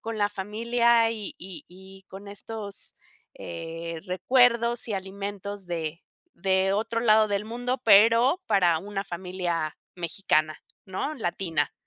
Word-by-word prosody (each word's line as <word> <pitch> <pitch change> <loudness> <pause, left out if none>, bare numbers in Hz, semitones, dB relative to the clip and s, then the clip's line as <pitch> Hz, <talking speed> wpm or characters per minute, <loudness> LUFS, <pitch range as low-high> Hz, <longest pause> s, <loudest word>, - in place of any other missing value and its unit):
con 225 -1 -5
la 205 -1 +3
familia 230 +3 +2
y 215 -3 -5
y 185 0 -8
y 190 +1 -14
con 195 +1 -10
estos, 205 0 -5 0.4
eh, 165 0 -6
recuerdos 235 +5 +3
y - - -2
alimentos 200 0 -5
de 165 -1 -4 0.3
de 190 0 +2
otro 225 +2 -1
lado 215 -2 +5
del 205 +1 -1
mundo 245 +3 -2
pero 230 - +6
para 180 -6 +3
una 195 +3 -4
familia 175 -3 -3 0.2
mexicana, 155 -3 0 0.3
¿no? 195 +10 -3
Latina, 175 - -1
195 Hz, 125 wpm, -26 LUFS, 180-225 Hz, 0.4 s, pero